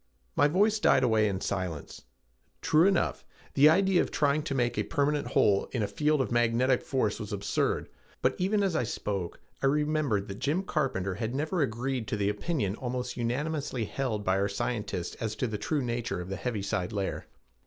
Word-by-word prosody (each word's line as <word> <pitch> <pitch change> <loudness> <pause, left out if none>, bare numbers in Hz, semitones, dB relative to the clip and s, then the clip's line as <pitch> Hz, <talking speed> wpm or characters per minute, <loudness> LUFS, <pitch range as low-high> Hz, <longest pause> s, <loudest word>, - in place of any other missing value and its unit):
My 145 - +5
voice 205 +7 +3
died 135 -10 +4
away 110 -3 +3
in 95 -2 -2
silence. 90 -10 -4 0.6
True 160 +4 +5
enough, 195 -3 +1 0.3
the 145 +2 +7
idea 190 +2 +4
of - - -2
trying 145 0 +2
to 140 - -2
make 120 -2 +1
a - - +1
permanent 145 0 0
hole 100 -1 +3
in 120 -4 0
a - - 0
field 150 +2 +1
of 130 - -2
magnetic 120 +2 +2
force 115 -7 -1
was 105 -3 -6
absurd, 100 -1 -1 0.4
but - - +3
even 200 +3 +2
as 190 -4 0
I - - +2
spoke 100 -6 -3 0.2
I 135 - +3
remembered 150 -7 +1
that 100 +1 -7
Jim 160 +7 0
Carpenter 130 - -1
had 110 +5 -3
never 155 +5 0
agreed 125 -1 -1
to 115 - -2
the 100 0 +1
opinion 105 - -1
almost 125 0 -3
unanimously 130 +1 -2
held 110 -4 -2
by 95 0 +2
our 100 +1 +1
scientists 105 -5 -3
as 110 -2 -3
to 130 - -1
the 110 -3 -3
true 145 +6 -1
nature 120 -5 -2
of 90 +1 -6
the 95 - -2
heaviside 100 -3 -2
layer. 100 -2 -3
125 Hz, 190 wpm, -29 LUFS, 105-150 Hz, 0.6 s, the